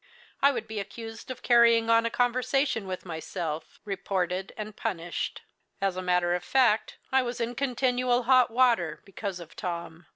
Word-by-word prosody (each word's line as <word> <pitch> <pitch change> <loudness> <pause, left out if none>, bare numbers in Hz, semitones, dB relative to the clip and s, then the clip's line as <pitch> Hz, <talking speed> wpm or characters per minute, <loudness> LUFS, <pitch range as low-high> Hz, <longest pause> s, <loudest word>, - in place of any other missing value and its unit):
I 280 - +6
would 230 -4 -4
be 220 -1 -4
accused 225 +4 -8
of 255 - -7
carrying 235 -1 +5
on 230 0 +4
a - - -1
conversation 245 -1 +1
with 185 0 -5
myself, 160 -1 -5
reported, 190 -2 -2
and 215 -1 -6
punished. 170 0 -3 0.4
As 195 -2 0
a 185 - -3
matter 180 -1 +2
of 180 0 -2
fact, 240 -1 +2
I 265 0 +4
was 245 -1 -4
in 235 +1 -1
continual 250 -1 +1
hot 255 0 +5
water 230 -9 +2
because 195 -2 -5
of 170 -2 -11
Tom. 170 -2 -5
220 Hz, 165 wpm, -28 LUFS, 180-245 Hz, 0.4 s, I